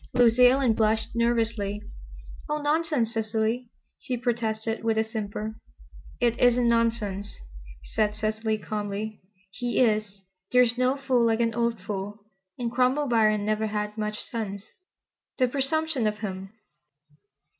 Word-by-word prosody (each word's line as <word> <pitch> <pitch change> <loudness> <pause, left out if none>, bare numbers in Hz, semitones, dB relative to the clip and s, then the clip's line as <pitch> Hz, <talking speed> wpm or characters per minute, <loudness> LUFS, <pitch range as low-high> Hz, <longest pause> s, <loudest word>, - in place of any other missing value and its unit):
Lucy 245 0 +6
Ellen 255 -2 +3
blushed 220 0 +1
nervously. 230 -3 0 0.7
"Oh, 300 0 0
nonsense, 295 -6 +1
Cecily," 225 +2 -1 0.3
she 250 - -3
protested 225 -2 -2
with 225 -1 +1
a 220 - +4
simper. 215 -1 -4 0.7
"It 240 -1 +1
isn't 245 0 +4
nonsense," 225 -4 0 0.5
said 210 - 0
Cecily 220 0 -1
calmly. 210 +1 -4 0.3
"He 245 +4 -3
is. 215 -4 +1 0.3
There 250 0 +6
is 240 -1 0
no 255 +2 +2
fool 255 -4 +2
like 225 0 +2
an 230 -1 +1
old 235 -1 0
fool, 200 +2 -5 0.3
and 240 -2 -2
Cromwell 255 +3 +2
Biron 215 -3 +3
never 215 +1 0
had 210 0 -3
much 215 -1 -3
sense. 200 -4 -5 0.7
The 255 - +3
presumption 275 -1 0
of 210 0 -1
him!" 195 -2 -5
225 Hz, 135 wpm, -26 LUFS, 215-245 Hz, 0.7 s, Lucy